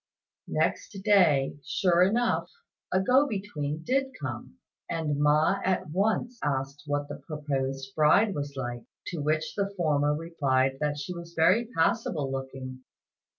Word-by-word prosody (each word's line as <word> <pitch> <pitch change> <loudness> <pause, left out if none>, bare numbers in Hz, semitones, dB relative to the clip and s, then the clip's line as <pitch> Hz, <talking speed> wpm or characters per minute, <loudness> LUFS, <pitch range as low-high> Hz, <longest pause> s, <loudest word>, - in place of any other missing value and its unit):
Next 200 - -1
day, 160 -10 +4
sure 180 -3 +2
enough, 230 +6 +2 0.4
a 185 - +3
go 260 +8 +4
between 160 - -4
did 265 +5 0
come, - - -6 0.3
and 155 -4 -1
Ma 155 +6 +3
at 185 -4 0
once 220 +6 0
asked 140 0 -2
what 145 0 -1
the - - -6
proposed 135 -3 -4
bride 175 +8 +4
was 140 -2 -4
like; 120 -2 -4 0.3
to 175 - -4
which 155 +1 0
the 200 -1 -1
former 150 -3 +2
replied 135 -5 0
that 150 -1 -1
she 145 +5 -5
was 170 -1 -9
very 185 +8 +4
passable 165 -5 +1
looking. 130 -1 -6
155 Hz, 140 wpm, -28 LUFS, 140-190 Hz, 0.4 s, day